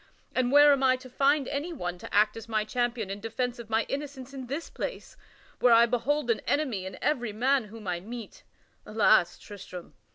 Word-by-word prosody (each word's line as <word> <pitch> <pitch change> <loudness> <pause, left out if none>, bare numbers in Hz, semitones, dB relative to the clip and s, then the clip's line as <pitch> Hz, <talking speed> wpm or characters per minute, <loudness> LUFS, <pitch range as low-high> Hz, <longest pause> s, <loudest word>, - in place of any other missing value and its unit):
And 255 -1 +1
where 290 0 +8
am 275 - 0
I 260 -1 +4
to 255 0 -11
find 275 +1 +2
any 290 +5 -3
one 180 - -5
to - - -10
act 210 +1 +3
as 225 0 -9
my 215 -1 0
champion 235 -2 -2
in 200 - -5
defence 240 +3 -3
of 230 -2 -9
my 225 0 +2
innocence 275 -2 -6
in 260 -2 -7
this 285 +6 -4
place, - - -6 0.4
where 245 -1 +5
I 230 +1 +7
behold 245 +2 0
an 225 - 0
enemy 245 -11 0
in 190 - -8
every 240 -7 0
man 255 +3 +2
whom 210 -1 -11
I 175 -1 -1
meet? 225 +3 -9 0.4
Alas, 205 -5 +3
Tristram! 185 -3 -10
240 Hz, 200 wpm, -28 LUFS, 215-275 Hz, 0.4 s, where